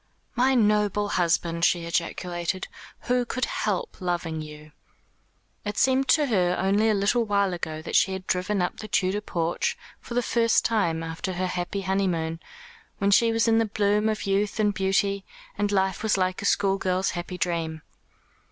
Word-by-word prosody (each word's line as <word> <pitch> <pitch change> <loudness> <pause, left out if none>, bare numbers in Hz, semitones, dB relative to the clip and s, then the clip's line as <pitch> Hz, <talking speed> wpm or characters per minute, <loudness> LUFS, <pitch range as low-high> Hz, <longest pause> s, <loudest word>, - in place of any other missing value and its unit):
"My 260 +2 +3
noble 210 -2 +2
husband," 170 -2 0
she 175 -1 +2
ejaculated. 175 +1 -2 0.3
"Who 250 0 +1
could 255 +1 -2
help - - -2
loving 170 -3 -2
you?" 150 0 -10 0.9
It 205 0 -4
seemed 265 +1 +3
to 305 -2 +4
her 180 -8 +1
only 200 +3 +2
a 215 - +3
little 210 +4 +2
while 200 -3 +1
ago 155 -2 -5
that - - -4
she 190 - +4
had 190 -1 -6
driven 185 +1 0
up 180 - -3
to - - -8
the 215 - -7
Tudor 195 0 0
porch 170 -4 -1 0.2
for 235 - -8
the 245 - +2
first 230 -1 +2
time 170 -8 +1
after 165 +3 -4
her 185 +1 -2
happy 180 +2 -3
honeymoon, 180 -4 -1 0.6
when 200 -1 +1
she 230 +3 +5
was 225 0 +1
in 225 0 +4
the 225 - +2
bloom 210 0 +1
of 215 - -2
youth 200 +2 0
and 210 -1 +2
beauty, 195 0 0 0.3
and 205 0 -1
life 190 -1 +1
was 220 -2 +1
like 185 0 0
a - - -4
schoolgirl's 195 -2 +1
happy 175 +1 -5
dream. 165 -3 -2
195 Hz, 175 wpm, -25 LUFS, 175-210 Hz, 0.9 s, she